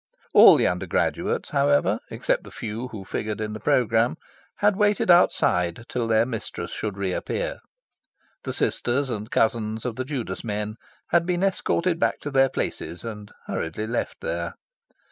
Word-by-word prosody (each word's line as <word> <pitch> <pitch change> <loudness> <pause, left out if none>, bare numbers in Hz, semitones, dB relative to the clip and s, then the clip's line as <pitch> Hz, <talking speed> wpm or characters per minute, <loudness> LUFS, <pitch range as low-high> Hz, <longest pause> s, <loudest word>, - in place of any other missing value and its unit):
All - - +10
the - - +2
undergraduates, 90 0 -1
however, 70 0 +2
except - - -1
the - - -11
few 110 +4 -5
who 105 -6 -8
figured 105 +2 -3
in 105 -1 -3
the 110 - -6
programme, 120 0 +2 0.4
had 205 -1 +2
waited 205 -2 +3
outside 90 - +3
till 120 -2 -1
their 110 0 +3
mistress 110 -7 -5
should 105 -2 -4
re 95 -2 -1
appear. - - -3 0.8
The - - -3
sisters 130 +2 0
and 110 -1 -4
cousins 110 -1 0
of 120 -2 -3
the 130 - -1
Judas 125 -10 -4
men 105 -1 -3 0.3
had 170 0 +3
been 180 0 0
escorted 185 -3 +1
back - - +1
to 145 - -5
their 135 -1 +4
places 85 - -4
and 105 -3 -7
hurriedly 80 +7 -3
left 115 +2 -3
there. - - -3
115 Hz, 160 wpm, -25 LUFS, 105-140 Hz, 0.8 s, All